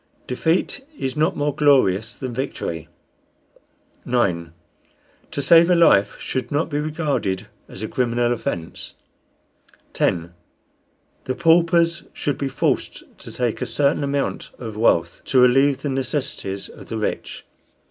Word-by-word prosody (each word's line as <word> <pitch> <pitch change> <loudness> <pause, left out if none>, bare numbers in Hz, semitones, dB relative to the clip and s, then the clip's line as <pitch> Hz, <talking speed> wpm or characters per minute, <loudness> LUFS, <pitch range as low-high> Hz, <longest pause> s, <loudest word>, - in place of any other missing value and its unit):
Defeat 165 - 0
is 130 -1 -3
not 155 +1 +1
more 145 0 0
glorious 120 -7 +3
than 130 -3 -5
victory. 85 - -4 1.2
9. 90 -9 0 0.8
To 140 - -3
save 170 +4 +6
a 180 - +5
life 105 -12 +4
should 130 +2 -3
not 150 +3 0
be 145 - 0
regarded 150 - -1 0.2
as 95 - -8
a - - -2
criminal 120 0 +1
offence. 85 -8 -5 1.0
10. 85 0 0 0.9
The 130 - -2
paupers 170 +1 +3
should 145 - -2
be 140 - -1
forced - - -2
to - - -10
take 120 -3 -2
a - - -1
certain 145 0 +1
amount 140 0 -2
of 110 -4 -7
wealth, 85 -6 +2
to 130 - +3
relieve 135 +2 +4
the 145 - -1
necessities 130 -6 -3
of - - -13
the - - -4
rich. - - -4
130 Hz, 135 wpm, -22 LUFS, 110-150 Hz, 1.2 s, save